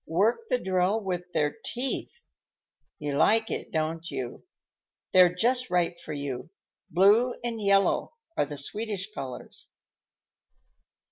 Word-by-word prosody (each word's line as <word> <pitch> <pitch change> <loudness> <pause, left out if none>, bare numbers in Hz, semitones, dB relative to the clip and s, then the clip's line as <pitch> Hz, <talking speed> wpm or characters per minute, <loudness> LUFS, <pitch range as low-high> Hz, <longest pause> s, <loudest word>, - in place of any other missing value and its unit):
Work 220 - +1
the - - +3
drill 190 0 +1
with 180 -2 -3
their 150 +6 0
teeth. 270 - -3 0.7
You 145 -1 -3
like 225 +6 +3
it, - - -4
don't 160 +1 -2
you? 125 - -6 0.7
They're 180 -1 +7
just 245 +5 +1
right 175 -1 +1
for 155 - -8
you. 140 -1 -4 0.4
Blue 210 +8 +5
and 230 -2 -3
yellow 200 - +2 0.2
are 145 - +1
the 145 0 -6
Swedish 210 +6 -3
colors." 130 -3 -7
185 Hz, 125 wpm, -28 LUFS, 155-225 Hz, 0.7 s, They're